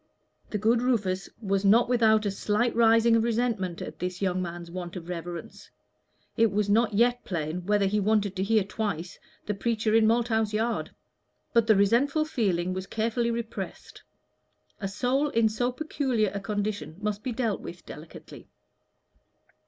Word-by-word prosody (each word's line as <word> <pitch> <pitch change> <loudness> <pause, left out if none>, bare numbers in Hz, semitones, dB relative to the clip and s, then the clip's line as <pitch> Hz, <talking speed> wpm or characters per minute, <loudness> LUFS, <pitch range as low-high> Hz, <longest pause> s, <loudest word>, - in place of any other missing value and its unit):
The 210 - -2
good 225 +3 +2
Rufus 200 -7 0
was 195 -3 -1
not 220 +4 +5
without 220 -3 +3
a 200 - +1
slight 210 +4 0
rising 230 0 +5
of 225 - +3
resentment 225 -7 -1
at - - -9
this 180 +1 -4
young 185 -2 0
man's 170 -1 -6
want 175 0 -6
of 175 -1 -8
reverence. 175 -1 -7 0.7
It 225 -2 +3
was 205 0 0
not 220 0 +2
yet 245 +3 +2
plain 170 0 -4
whether 205 -1 +3
he 205 +2 +1
wanted 205 -1 +1
to 190 - -1
hear 215 0 +3
twice 190 -4 -4 0.3
the 210 - -1
preacher 220 +1 -1
in 225 -1 +5
Malthouse 225 -2 +1
Yard. 225 +2 -1 0.6
But 230 -2 +3
the 220 - +6
resentful 250 +10 +3
feeling 185 - 0
was 185 +1 -5
carefully 230 +2 -1
repressed: 230 -1 -6 0.8
a 195 - -3
soul 250 +9 0
in 230 -4 +3
so 245 +3 -1
peculiar 255 -7 -1
a 200 - -3
condition 205 -4 -3
must 210 0 -2
be 255 - -3
dealt 225 -3 -1
with 175 0 -9
delicately. 155 +2 -11
215 Hz, 160 wpm, -27 LUFS, 190-230 Hz, 0.8 s, the